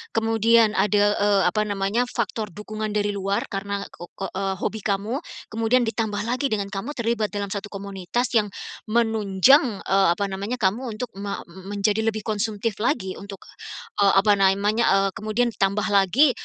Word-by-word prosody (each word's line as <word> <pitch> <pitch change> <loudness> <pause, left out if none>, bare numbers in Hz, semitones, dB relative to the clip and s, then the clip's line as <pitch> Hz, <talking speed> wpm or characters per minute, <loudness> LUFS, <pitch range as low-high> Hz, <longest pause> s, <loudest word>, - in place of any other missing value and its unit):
kemudian 225 0 +4
ada, 205 0 +2
eee, 205 -1 +3
apa 215 +2 0
namanya, 205 +4 0
faktor 225 -2 -3
dukungan 215 +3 -6
dari 205 0 +1
luar 200 0 -1
karena 200 0 -3
ke 175 - -10
ko 195 - -5
eee, 195 0 -2
hobi 220 +3 -3
kamu, 210 +5 -1 0.3
kemudian 230 +3 +2
ditambah 220 -3 -2
lagi 250 +5 -1
dengan 200 -5 -2
kamu 215 +9 -5
terlibat 230 -2 0
dalam 200 0 -4
1 200 +1 -4
komunitas 200 +4 -3
yang 215 -3 +3 0.4
menunjang, 220 +1 +3
eee, 195 0 +3
apa 200 +1 -2
namanya, 200 +5 -3
kamu 225 +2 -1
untuk 240 +2 -5
me 200 0 -3 0.3
menjadi 205 +2 0
lebih 215 -1 -1
konsumtif 215 0 -2
lagi 210 -5 -1
untuk, 200 -1 -10 0.6
eee, 200 -1 +5
apa 200 +2 +5
namanya, 200 +4 +3
eee, 195 0 +2
kemudian 215 +4 -1
ditambah 200 0 0
lagi, 205 - +4
210 Hz, 160 wpm, -24 LUFS, 200-225 Hz, 0.6 s, eee